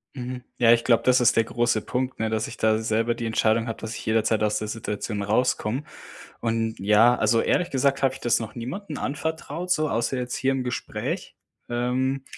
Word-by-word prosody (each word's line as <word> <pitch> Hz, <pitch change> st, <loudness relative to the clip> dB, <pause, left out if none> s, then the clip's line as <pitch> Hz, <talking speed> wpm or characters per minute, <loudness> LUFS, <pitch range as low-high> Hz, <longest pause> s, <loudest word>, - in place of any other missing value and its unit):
Mhm, 125 Hz, -1 st, -6 dB
ja, 120 Hz, -1 st, +6 dB
ich 115 Hz, 0 st, +2 dB
glaube, 115 Hz, -2 st, +3 dB
das 125 Hz, 0 st, +4 dB
ist 115 Hz, -1 st, +4 dB
der 115 Hz, -, +4 dB
große 120 Hz, -1 st, +1 dB
Punkt, 130 Hz, +1 st, -3 dB
ne? 110 Hz, 0 st, 0 dB
Dass 110 Hz, 0 st, -1 dB
ich -, -, -9 dB
da 110 Hz, 0 st, +3 dB
selber 115 Hz, +1 st, 0 dB
die 120 Hz, -1 st, -4 dB
Entscheidung 115 Hz, +1 st, +1 dB
habe, 115 Hz, -, -4 dB
dass 110 Hz, 0 st, -6 dB
ich -, -, -8 dB
jederzeit 110 Hz, 0 st, +1 dB
aus 105 Hz, 0 st, +1 dB
der 110 Hz, -, -4 dB
Situation 105 Hz, -1 st, -4 dB
rauskomme. 120 Hz, +3 st, 0 dB, 0.6 s
Und 115 Hz, -1 st, -1 dB
ja, 105 Hz, +5 st, +5 dB
also, 115 Hz, 0 st, +2 dB
ehrlich 180 Hz, -, +1 dB
gesagt 135 Hz, +1 st, +1 dB
habe 135 Hz, -1 st, +2 dB
ich 135 Hz, -, -11 dB
das 120 Hz, -1 st, +2 dB
noch 110 Hz, -, -6 dB
niemanden 150 Hz, -, -6 dB
anvertraut, 160 Hz, +4 st, -4 dB
so 155 Hz, -4 st, +2 dB
außer 115 Hz, +3 st, 0 dB
jetzt 125 Hz, -1 st, -3 dB
hier 135 Hz, 0 st, +1 dB
im 130 Hz, -1 st, -2 dB
Gespräch. 125 Hz, 0 st, -4 dB, 0.3 s
Ähm, 130 Hz, +3 st, -1 dB
120 Hz, 205 wpm, -25 LUFS, 110-130 Hz, 0.6 s, ja